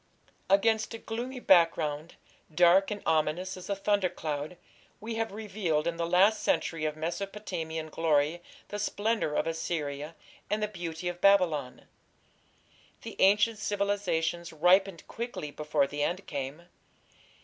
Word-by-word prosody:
Against 220 Hz, +3 st, +2 dB
a -, -, -5 dB
gloomy 240 Hz, +4 st, -5 dB
background, 165 Hz, -6 st, +2 dB, 0.4 s
dark 175 Hz, +4 st, +5 dB
and 210 Hz, -1 st, -5 dB
ominous 160 Hz, +4 st, 0 dB
as 185 Hz, +1 st, -10 dB
a 200 Hz, -, 0 dB
thundercloud, 180 Hz, -6 st, -1 dB, 0.4 s
we 225 Hz, +2 st, -5 dB
have 225 Hz, -1 st, -2 dB
revealed 195 Hz, -7 st, -2 dB
in 170 Hz, 0 st, -2 dB
the 170 Hz, 0 st, -1 dB
last 190 Hz, +5 st, +4 dB
century 165 Hz, -2 st, 0 dB
of 155 Hz, 0 st, -2 dB
Mesopotamian 170 Hz, -2 st, -4 dB
glory 155 Hz, +1 st, +1 dB, 0.3 s
the 205 Hz, -, -4 dB
splendour 210 Hz, -6 st, -1 dB
of -, -, +1 dB
Assyria 160 Hz, -2 st, -3 dB, 0.3 s
and 210 Hz, +1 st, 0 dB
the -, -, +1 dB
beauty 175 Hz, -4 st, -6 dB
of 175 Hz, 0 st, -4 dB
Babylon. 175 Hz, -10 st, +3 dB, 1.2 s
The -, -, -7 dB
ancient 210 Hz, +3 st, +4 dB
civilizations 195 Hz, -5 st, -1 dB
ripened 180 Hz, +2 st, +3 dB
quickly 230 Hz, -11 st, -5 dB
before 150 Hz, -1 st, 0 dB
the 145 Hz, +1 st, -5 dB
end 180 Hz, +6 st, -1 dB
came. 140 Hz, +3 st, -5 dB
175 Hz, 130 wpm, -29 LUFS, 160-205 Hz, 1.2 s, dark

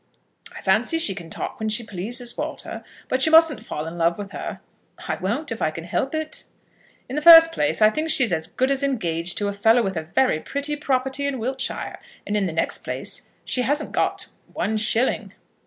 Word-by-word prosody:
"I -, -, -10 dB
fancy 330 Hz, -, +2 dB
she 270 Hz, -12 st, +2 dB
can 170 Hz, -3 st, -9 dB
talk -, -, -5 dB
when 220 Hz, 0 st, -2 dB
she 225 Hz, +3 st, +2 dB
pleases, 230 Hz, +5 st, -3 dB
Walter. -, -, -5 dB, 0.2 s
But 260 Hz, +1 st, 0 dB
you -, -, +2 dB
mustn't 320 Hz, -7 st, +6 dB
fall 155 Hz, -9 st, -5 dB
in 165 Hz, +1 st, -7 dB
love 170 Hz, +1 st, +2 dB
with 200 Hz, -1 st, -7 dB
her." -, -, -6 dB, 0.5 s
"I -, -, -2 dB
won't, 235 Hz, +11 st, -3 dB
if 230 Hz, -, -5 dB
I -, -, +2 dB
can 165 Hz, +1 st, -8 dB
help 185 Hz, -, -2 dB
it." 315 Hz, 0 st, -4 dB, 0.6 s
"In 260 Hz, -, -6 dB
the 300 Hz, -, -1 dB
first 330 Hz, 0 st, +10 dB
place 290 Hz, -8 st, +1 dB
I 215 Hz, -, +6 dB
think 310 Hz, +6 st, -2 dB
she 275 Hz, -, +4 dB
is 225 Hz, -, +1 dB
as 160 Hz, 0 st, -1 dB
good 260 Hz, +9 st, 0 dB
as 275 Hz, 0 st, +2 dB
engaged 175 Hz, -11 st, -1 dB
to 205 Hz, -, 0 dB
a 200 Hz, -, -2 dB
fellow 225 Hz, +4 st, +3 dB
with 195 Hz, -2 st, -2 dB
a 160 Hz, -, -4 dB
very 260 Hz, -12 st, +3 dB
pretty 285 Hz, -, -3 dB
property 270 Hz, -1 st, -1 dB
in 280 Hz, -2 st, -2 dB
Wiltshire, 255 Hz, +3 st, -4 dB, 0.3 s
and 205 Hz, -, -2 dB
in 200 Hz, -2 st, +1 dB
the -, -, -3 dB
next 165 Hz, -, 0 dB
place -, -, -4 dB, 0.2 s
she 250 Hz, -, 0 dB
hasn't 290 Hz, +4 st, -1 dB
got -, -, 0 dB, 0.2 s
one 220 Hz, -, -1 dB
shilling." 225 Hz, +4 st, +1 dB
235 Hz, 215 wpm, -23 LUFS, 195-280 Hz, 0.6 s, first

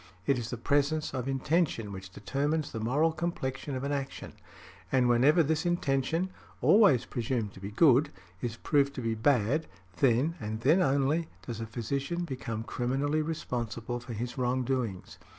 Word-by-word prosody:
It 135 Hz, -3 st, +2 dB
is 120 Hz, -1 st, -5 dB
the 120 Hz, -, -4 dB
presence 145 Hz, +5 st, +1 dB
of 130 Hz, -1 st, -3 dB
intention 135 Hz, -, 0 dB
which 95 Hz, -1 st, -8 dB
determines 145 Hz, +10 st, -2 dB
the 110 Hz, -, -4 dB
moral 145 Hz, +9 st, +2 dB
complexion 150 Hz, -5 st, -3 dB
of 130 Hz, -, -4 dB
an 140 Hz, -, -1 dB
action, 140 Hz, -1 st, -4 dB, 0.6 s
and 130 Hz, -2 st, +3 dB
whenever 135 Hz, +8 st, +5 dB
this 160 Hz, +2 st, 0 dB
intention 170 Hz, +1 st, 0 dB, 0.3 s
(always 175 Hz, -, +5 dB
presumed 115 Hz, -4 st, -2 dB
to -, -, -12 dB
be 100 Hz, +1 st, -6 dB
good) 135 Hz, +5 st, +5 dB, 0.3 s
is 120 Hz, -2 st, -3 dB
proved 140 Hz, +2 st, +1 dB
to 130 Hz, -, -4 dB
be 115 Hz, -1 st, 0 dB
bad, 130 Hz, +5 st, +2 dB, 0.3 s
then, 135 Hz, +5 st, +3 dB
and 110 Hz, 0 st, -4 dB
then 155 Hz, +9 st, +4 dB
only, 140 Hz, +2 st, +2 dB, 0.2 s
does 115 Hz, -3 st, -5 dB
a 115 Hz, -, -4 dB
physician 140 Hz, +10 st, -2 dB
become 115 Hz, -6 st, -4 dB
criminally 135 Hz, +6 st, 0 dB
responsible 120 Hz, -6 st, -3 dB
for 120 Hz, 0 st, -8 dB
his 120 Hz, +4 st, -4 dB
wrongdoings. 125 Hz, -5 st, -1 dB
135 Hz, 160 wpm, -30 LUFS, 120-150 Hz, 0.6 s, whenever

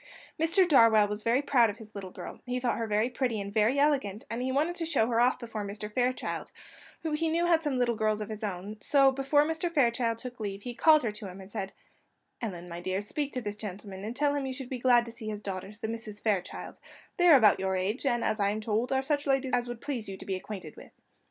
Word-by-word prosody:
Mr. 345 Hz, +3 st, +5 dB
Darwell 230 Hz, -8 st, +6 dB
was 210 Hz, +1 st, -3 dB, 0.2 s
proud 240 Hz, -6 st, +4 dB
of 205 Hz, -, -6 dB
his 220 Hz, -2 st, -13 dB
little 195 Hz, -2 st, -7 dB
girl; -, -, -9 dB
he 250 Hz, 0 st, -1 dB
thought 245 Hz, -2 st, -1 dB
her 225 Hz, -, -2 dB
very 215 Hz, +2 st, +2 dB
pretty 245 Hz, -3 st, -1 dB
and 200 Hz, 0 st, -5 dB
very 220 Hz, +5 st, +3 dB
elegant, 275 Hz, -8 st, +1 dB
and 230 Hz, +2 st, -2 dB
he 260 Hz, +1 st, -1 dB
wanted 300 Hz, +6 st, +1 dB
to 345 Hz, -, -2 dB
show 320 Hz, -9 st, +2 dB
her 235 Hz, 0 st, +1 dB
off 250 Hz, +1 st, +3 dB
before 225 Hz, -3 st, -5 dB
Mr. 210 Hz, +1 st, -6 dB
Fairchild, 255 Hz, +1 st, -1 dB, 0.5 s
who 320 Hz, -, -2 dB
he 320 Hz, +2 st, 0 dB
knew 335 Hz, +2 st, +1 dB
had 335 Hz, -2 st, +4 dB
some 295 Hz, -5 st, 0 dB
little 245 Hz, -1 st, +2 dB
girls 215 Hz, -1 st, +1 dB
of 210 Hz, -, -4 dB
his 215 Hz, 0 st, -6 dB
own; 200 Hz, +1 st, -4 dB
so 275 Hz, +2 st, +5 dB
before 275 Hz, +2 st, +2 dB
Mr. 320 Hz, +2 st, -1 dB
Fairchild 235 Hz, -6 st, +1 dB
took 250 Hz, 0 st, -8 dB
leave, 200 Hz, -2 st, -5 dB
he 245 Hz, -, -5 dB
called 310 Hz, +4 st, +5 dB
her 225 Hz, -, 0 dB
to 210 Hz, -1 st, -7 dB
him, 185 Hz, +1 st, -9 dB
and 190 Hz, +1 st, -11 dB
said: 195 Hz, 0 st, -4 dB, 0.7 s
"Ellen, 180 Hz, -6 st, -5 dB
my 170 Hz, 0 st, -7 dB
dear, 185 Hz, +2 st, -1 dB
speak 280 Hz, +8 st, -3 dB
to 255 Hz, -, -2 dB
this 205 Hz, -2 st, -4 dB
gentleman, 200 Hz, -2 st, -7 dB
and 225 Hz, +3 st, -5 dB
tell 290 Hz, +1 st, +2 dB
him 285 Hz, -, -1 dB
that 270 Hz, -, -3 dB
you 260 Hz, -, -3 dB
should 260 Hz, -2 st, -7 dB
be 255 Hz, -, -4 dB
glad 245 Hz, -1 st, +4 dB
to 230 Hz, -, -8 dB
see 225 Hz, -1 st, -8 dB
his 210 Hz, -1 st, -5 dB
daughters, 195 Hz, +2 st, -6 dB
the -, -, -2 dB
Misses 220 Hz, -2 st, -6 dB
Fairchild; 205 Hz, -5 st, -2 dB, 0.4 s
they 355 Hz, -, +4 dB
are 325 Hz, -, +9 dB
about 215 Hz, -5 st, +5 dB
your 190 Hz, 0 st, 0 dB
age, 195 Hz, +7 st, -1 dB
and, 240 Hz, -4 st, +1 dB
as 215 Hz, 0 st, 0 dB
I 200 Hz, -1 st, +2 dB
am 210 Hz, +1 st, -2 dB
told, 220 Hz, +3 st, -1 dB
are 265 Hz, 0 st, +1 dB
such 290 Hz, +1 st, -1 dB
ladies 270 Hz, -1 st, +1 dB
as 245 Hz, 0 st, +1 dB
would 240 Hz, -1 st, -6 dB
please 245 Hz, -8 st, -4 dB
you 190 Hz, -, -6 dB
to -, -, -10 dB
be 195 Hz, -, -2 dB
acquainted 185 Hz, -4 st, -7 dB
with." -, -, -13 dB
230 Hz, 260 wpm, -29 LUFS, 210-270 Hz, 0.7 s, are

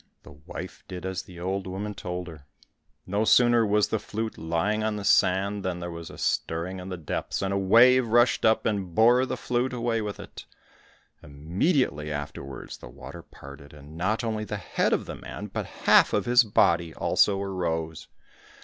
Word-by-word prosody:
The -, -, -13 dB
wife 80 Hz, +5 st, -9 dB
did 90 Hz, -1 st, -7 dB
as 95 Hz, -1 st, -3 dB
the 90 Hz, -2 st, -13 dB
old 95 Hz, +2 st, -3 dB
woman 100 Hz, +3 st, -4 dB
told 90 Hz, -2 st, -5 dB
her. 75 Hz, -4 st, -12 dB, 0.6 s
No 100 Hz, +3 st, 0 dB
sooner 120 Hz, 0 st, +5 dB
was 105 Hz, 0 st, +2 dB
the 110 Hz, -, 0 dB
flute 110 Hz, +2 st, -4 dB
lying 85 Hz, +7 st, -1 dB
on 110 Hz, -1 st, -1 dB
the 105 Hz, -, -5 dB
sand 100 Hz, +1 st, +2 dB
than 90 Hz, -2 st, -3 dB
there 85 Hz, 0 st, -5 dB
was 85 Hz, -1 st, -8 dB
a -, -, -11 dB
stirring 85 Hz, +3 st, -2 dB
in 90 Hz, +1 st, -8 dB
the 90 Hz, -, -5 dB
depths, 80 Hz, +4 st, -4 dB
and 95 Hz, 0 st, -1 dB
a -, -, +1 dB
wave 120 Hz, +6 st, +5 dB
rushed 120 Hz, +2 st, +3 dB
up 110 Hz, 0 st, +3 dB
and 95 Hz, -6 st, -2 dB
bore 120 Hz, +3 st, +5 dB
the -, -, -3 dB
flute 125 Hz, +1 st, -1 dB
away 120 Hz, -2 st, -1 dB
with 105 Hz, -1 st, -5 dB
it. -, -, -10 dB, 0.8 s
Immediately 75 Hz, -, -1 dB
afterwards 70 Hz, -3 st, -7 dB
the -, -, -11 dB
water -, -, -10 dB
parted, 70 Hz, +2 st, -13 dB
and 75 Hz, +1 st, -13 dB
not 95 Hz, +8 st, -1 dB
only 110 Hz, -2 st, -2 dB
the 105 Hz, 0 st, -4 dB
head 90 Hz, -, -1 dB
of -, -, 0 dB
the -, -, -7 dB
man, -, -, -8 dB
but -, -, -3 dB, 0.2 s
half -, -, +6 dB
of 105 Hz, -, +1 dB
his 120 Hz, 0 st, +5 dB
body 85 Hz, -6 st, +2 dB
also 100 Hz, -1 st, +2 dB
arose. 80 Hz, -5 st, -3 dB
95 Hz, 185 wpm, -26 LUFS, 85-110 Hz, 0.8 s, half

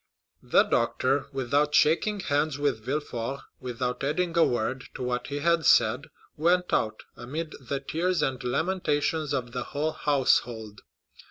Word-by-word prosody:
The -, -, +4 dB
doctor, 135 Hz, +2 st, +1 dB
without 140 Hz, +3 st, +1 dB
shaking 195 Hz, +8 st, +3 dB
hands 145 Hz, -2 st, 0 dB
with 140 Hz, -7 st, -1 dB
Villefort, 135 Hz, -1 st, -3 dB, 0.2 s
without 125 Hz, 0 st, -3 dB
adding 165 Hz, +5 st, 0 dB
a 170 Hz, -, +6 dB
word 125 Hz, +1 st, -1 dB
to 130 Hz, -, -5 dB
what 125 Hz, 0 st, -2 dB
he 145 Hz, -, -4 dB
had 170 Hz, +1 st, +2 dB
said, -, -, +4 dB, 0.3 s
went 180 Hz, +3 st, +2 dB
out, 110 Hz, 0 st, 0 dB
amid 155 Hz, +7 st, -5 dB
the 135 Hz, +2 st, -3 dB
tears 170 Hz, +5 st, 0 dB
and 130 Hz, -1 st, -2 dB
lamentations 150 Hz, +1 st, 0 dB
of 125 Hz, -4 st, -2 dB
the 125 Hz, 0 st, -3 dB
whole 155 Hz, +2 st, 0 dB
household. 120 Hz, -8 st, 0 dB
140 Hz, 145 wpm, -27 LUFS, 125-155 Hz, 0.3 s, a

